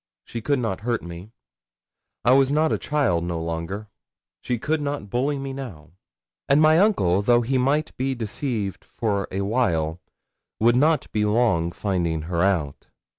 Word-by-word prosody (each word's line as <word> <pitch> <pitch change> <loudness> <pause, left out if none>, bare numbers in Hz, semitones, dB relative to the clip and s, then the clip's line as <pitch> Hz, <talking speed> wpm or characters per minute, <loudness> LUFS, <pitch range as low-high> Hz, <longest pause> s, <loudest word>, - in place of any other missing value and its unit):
she 115 - -6
could 140 +5 +1
not 115 -7 -2
hurt 115 0 -1
me. 85 +5 -9 0.9
I 120 - +5
was 135 +1 +5
not 155 +2 +2
a - - -1
child 135 - 0
no 85 -1 -3
longer 85 +6 -4 0.5
she 125 - -1
could 155 +6 -1
not 140 -8 -4
bully 140 +4 0
me 135 0 -5
now; 110 - -8 0.6
and 140 +2 +5
my 155 +1 +5
uncle, 100 - +3
though 120 +3 +4
he 130 +2 0
might 145 +4 0
be 135 +1 -1
deceived 110 -3 -3
for 100 -4 -2
a 95 - -2
while, 90 -7 0 0.6
would 115 +2 +4
not 150 +3 +3
be 105 - 0
long 105 -6 +2
finding 85 -5 -1
her 85 +1 -1
out. 85 -7 0
115 Hz, 165 wpm, -24 LUFS, 90-135 Hz, 0.9 s, I